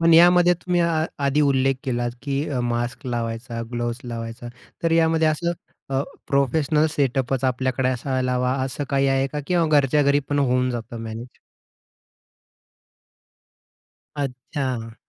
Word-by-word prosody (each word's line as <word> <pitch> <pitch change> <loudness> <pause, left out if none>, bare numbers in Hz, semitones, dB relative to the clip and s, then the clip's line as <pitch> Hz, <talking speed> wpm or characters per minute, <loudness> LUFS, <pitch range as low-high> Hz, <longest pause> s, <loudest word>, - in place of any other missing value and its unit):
पण 165 0 +5
यामध्ये 175 +1 +7
तुम्ही 175 0 -1
आ 165 -2 +2 0.2
आधी 140 +2 +2
उल्लेख 135 -2 +3
केलात 120 -2 -1
की 140 +1 -1
अ, 130 -4 -1
मास्क 120 +2 -2
लावायचा, 115 0 -3
ग्लोज 120 0 -2
लावायचा. 115 0 -6 0.3
तर 165 - +2
यामध्ये 160 -1 +3
असं 170 +3 0 0.4
अ, 135 0 +1 0.3
प्रोफेशनल 145 +3 +2
सेटअपच 135 -2 0
आपल्याकडे 130 0 0
असायला 130 0 -1
हवा 125 0 +1
असं 135 +2 -4
काही 140 0 +2
आहे 135 0 +2
का 150 - -2
किंवा 175 -2 +2
घरच्या 145 +2 +3
घरी 140 0 +4
पण 145 - 0
होऊन 125 -2 +2
जातं 120 -1 -5
मॅनेज? 115 +2 -8 2.8
अच्छा. 130 -3 -3
135 Hz, 135 wpm, -23 LUFS, 120-150 Hz, 2.8 s, यामध्ये